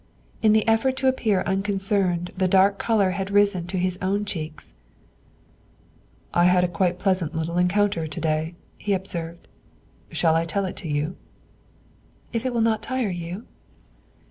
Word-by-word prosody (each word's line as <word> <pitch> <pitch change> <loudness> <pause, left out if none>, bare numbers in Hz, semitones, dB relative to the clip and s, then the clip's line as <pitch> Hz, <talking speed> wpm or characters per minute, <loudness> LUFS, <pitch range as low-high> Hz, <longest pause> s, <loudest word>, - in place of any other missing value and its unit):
In 215 -1 +5
the 220 0 +2
effort 240 +4 +2
to 265 - +1
appear 220 -7 +2
unconcerned 195 -2 0
the 185 -1 +1
dark 195 +2 +4
color 205 -5 +2
had 195 +1 -3
risen 200 -3 +2
to 185 +1 -3
his 185 0 -1
own 200 +3 0
cheeks. 155 - -6 1.6
"I 175 - +4
had 180 -1 +3
quite 180 +1 +2
a - - -17
pleasant 185 -5 0
little 165 +2 -1
encounter 180 -2 +1
to 155 +3 -6
day," 160 +1 -1 0.2
he 205 - 0
observed; 170 -3 -4 0.6
"shall 160 -2 +2
I 165 +1 +2
tell 195 +4 -1
it 185 - -5
to 170 - -6
you?" 150 +3 -2 1.2
"If 230 +2 -1
it - - -1
will 235 -1 0
not 220 -1 +2
tire 255 -6 -1
you." 175 +5 -6
185 Hz, 160 wpm, -24 LUFS, 170-205 Hz, 1.6 s, In